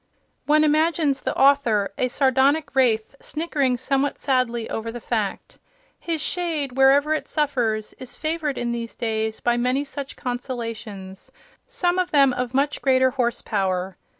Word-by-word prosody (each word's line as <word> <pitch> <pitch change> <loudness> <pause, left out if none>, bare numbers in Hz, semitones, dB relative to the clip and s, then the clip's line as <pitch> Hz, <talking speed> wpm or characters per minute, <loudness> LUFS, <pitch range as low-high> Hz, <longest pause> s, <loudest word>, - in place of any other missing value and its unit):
One 305 +1 +4
imagines 310 -2 +2
the - - -3
author, 245 -8 +3
a 255 - 0
sardonic 275 +4 +2
wraith, 230 -4 +2
snickering 295 -5 -1
somewhat 275 +2 0
sadly 250 -4 0
over 225 +1 -4
the 240 - -7
fact. 230 - -3 0.4
His 330 -2 -3
shade, 320 -6 -2
wherever 270 +4 +4
it 310 - -3
suffers, 240 -8 -1
is 255 - -9
favoured 310 -3 -2
in 240 0 -2
these 235 -1 -4
days 220 -1 -2
by 240 0 +1
many 250 +3 +1
such 280 -1 -6
consolations, 230 -6 -6 0.4
some 370 -8 0
of 365 - 0
them 275 -3 +4
of 250 0 -3
much 285 +2 0
greater 260 -1 +3
horsepower. 195 -7 -1
260 Hz, 145 wpm, -23 LUFS, 235-290 Hz, 0.4 s, One